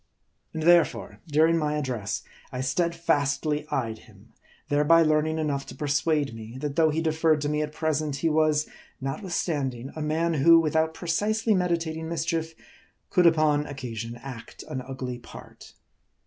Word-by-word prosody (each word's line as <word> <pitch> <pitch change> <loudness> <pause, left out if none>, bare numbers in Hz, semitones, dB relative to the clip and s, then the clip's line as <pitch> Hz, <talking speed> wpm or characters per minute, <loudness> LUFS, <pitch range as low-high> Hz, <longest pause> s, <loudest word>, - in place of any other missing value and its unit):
And 160 - -4
therefore 170 -1 +3
during 160 +2 +3
my 150 -1 0
address, 125 -8 -3 0.3
I 125 - -4
steadfastly 150 -1 0
eyed 110 -5 -2
him; - - -20 0.3
thereby 150 +3 +5
learning 155 0 +1
enough 145 -3 -1
to - - -9
persuade 145 -2 0
me, 115 +2 -9
that 145 +1 -4
though 160 0 +4
he 160 +2 -1
de 160 - +2
ferred 160 -1 +2
to 145 - -1
me 150 0 0
at 150 0 -3
present, 155 -2 -1
he 150 +4 -1
was, 155 -1 +2 0.3
notwithstanding, 135 - -3
a 155 - -5
man 160 +2 0
who, 165 +3 +6
without 160 0 +1
precisely 210 +6 0
meditating 165 -3 -1
mischief, 165 -1 -2 0.6
could 180 -1 +5
upon 155 -2 +3
oc 140 - -8
casion 115 -2 -5
act 125 -4 -9
an 130 - -4
ugly 130 -1 -6
part. - - -13
155 Hz, 155 wpm, -26 LUFS, 140-165 Hz, 0.6 s, who